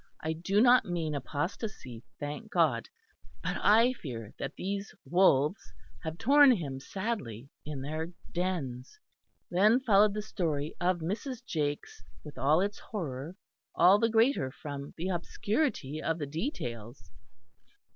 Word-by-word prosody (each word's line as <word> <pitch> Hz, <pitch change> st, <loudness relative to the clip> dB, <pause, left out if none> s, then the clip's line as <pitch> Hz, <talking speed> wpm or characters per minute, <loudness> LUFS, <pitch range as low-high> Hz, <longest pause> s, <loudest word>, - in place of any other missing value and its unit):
I 160 Hz, 0 st, 0 dB
do 185 Hz, +5 st, 0 dB
not 250 Hz, +1 st, +6 dB
mean 165 Hz, -3 st, -2 dB
apostacy, 145 Hz, -, -4 dB, 0.2 s
thank 150 Hz, +9 st, -5 dB
God. 150 Hz, -10 st, +2 dB, 0.5 s
But -, -, -1 dB
I 230 Hz, +5 st, +5 dB
fear 115 Hz, -, -7 dB
that 140 Hz, -, -4 dB
these 200 Hz, +2 st, -4 dB
wolves 175 Hz, -2 st, +3 dB, 0.4 s
have 160 Hz, 0 st, -5 dB
torn 280 Hz, +6 st, +6 dB
him 140 Hz, -, -4 dB
sadly, 140 Hz, -, -4 dB, 0.2 s
in 145 Hz, -3 st, -4 dB
their 155 Hz, +3 st, -3 dB, 0.2 s
dens." 170 Hz, -, -3 dB, 0.5 s
Then 210 Hz, +7 st, +5 dB
followed 210 Hz, -4 st, +4 dB
the 210 Hz, -, -2 dB
story 155 Hz, -8 st, -2 dB
of 175 Hz, -1 st, +1 dB
Mrs. 235 Hz, -, -4 dB
Jakes, 145 Hz, -, -3 dB, 0.2 s
with 150 Hz, -4 st, -10 dB
all 150 Hz, +6 st, +4 dB
its 205 Hz, +1 st, -2 dB
horror, 160 Hz, -, -5 dB, 0.4 s
all 185 Hz, +4 st, +6 dB
the 230 Hz, -, +3 dB
greater 225 Hz, -, +3 dB
from 140 Hz, 0 st, -8 dB
the 175 Hz, +3 st, -2 dB
obscurity 180 Hz, -, -1 dB
of 165 Hz, 0 st, -1 dB
the 150 Hz, -, -3 dB
details. 130 Hz, -, -5 dB
170 Hz, 135 wpm, -30 LUFS, 145-210 Hz, 0.5 s, not